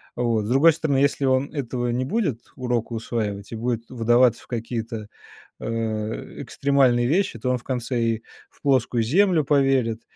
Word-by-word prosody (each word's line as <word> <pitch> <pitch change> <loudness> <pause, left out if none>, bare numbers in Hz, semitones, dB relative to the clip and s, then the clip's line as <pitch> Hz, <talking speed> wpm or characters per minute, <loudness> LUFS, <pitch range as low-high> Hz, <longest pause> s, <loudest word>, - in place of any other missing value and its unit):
Вот. 115 -3 0
С - - -4
другой 145 +6 +6
стороны, 150 -3 0
если 140 0 +2
он 130 +1 +1
этого 125 -4 -2
не 125 +2 -1
будет 145 - -1
урока 120 -2 -2
усваивать 110 -3 -3
и - - -4
будет 115 0 -3
вдаваться 120 0 +3
в - - -21
какие-то, 115 -2 -4 0.5
а, - - -7 0.8
экстремальные 130 -4 +2
вещи, 165 -4 0
то 125 - -2
он 125 - +2
в 120 - -15
конце 125 -1 -2
и 115 -1 0 0.3
в - - -29
плоскую 130 -4 +2
Землю 170 - +3
поверит, 135 -5 +2
125 Hz, 165 wpm, -23 LUFS, 115-135 Hz, 0.8 s, другой